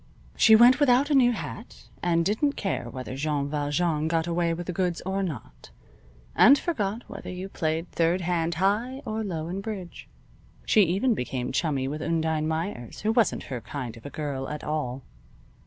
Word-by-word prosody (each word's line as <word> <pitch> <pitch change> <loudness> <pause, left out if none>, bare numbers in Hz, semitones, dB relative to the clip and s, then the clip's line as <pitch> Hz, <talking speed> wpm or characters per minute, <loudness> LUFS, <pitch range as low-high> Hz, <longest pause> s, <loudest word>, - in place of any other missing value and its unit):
She 220 - +7
went 245 +4 +7
without 280 +1 +4
a - - +4
new 250 -3 +5
hat, 225 0 -7 0.2
and 170 -1 +1
didn't 250 - +1
care 195 - -3
whether 130 +1 -6
Jean 145 0 -1
Valjean 150 +2 0
got 165 0 +1
away 170 0 0
with 170 +1 -4
the 180 - -4
goods 180 -1 -1
or 190 +1 -1
not, 155 - -6 0.7
and 275 +4 +7
forgot 225 - -2
whether - - -8
you 185 +1 -5
played 165 -2 -2
third 170 +2 +1
hand 170 -1 0
high 220 - 0
or 220 0 -2
low 165 -6 -4
in 185 +3 -4
bridge. 200 -5 -7 0.6
She 215 - +5
even 195 +9 +1
became 125 - -3
chummy 140 -5 0
with 150 +3 -4
Undine 160 -1 0
Meyers, 160 - -4
who 215 - +1
wasn't 225 -2 +2
her 120 - -4
kind 125 -1 -6
of 115 - -14
a - - -7
girl 140 -3 -4
at 150 0 -6
all. 135 -4 -3
170 Hz, 180 wpm, -26 LUFS, 150-210 Hz, 0.7 s, She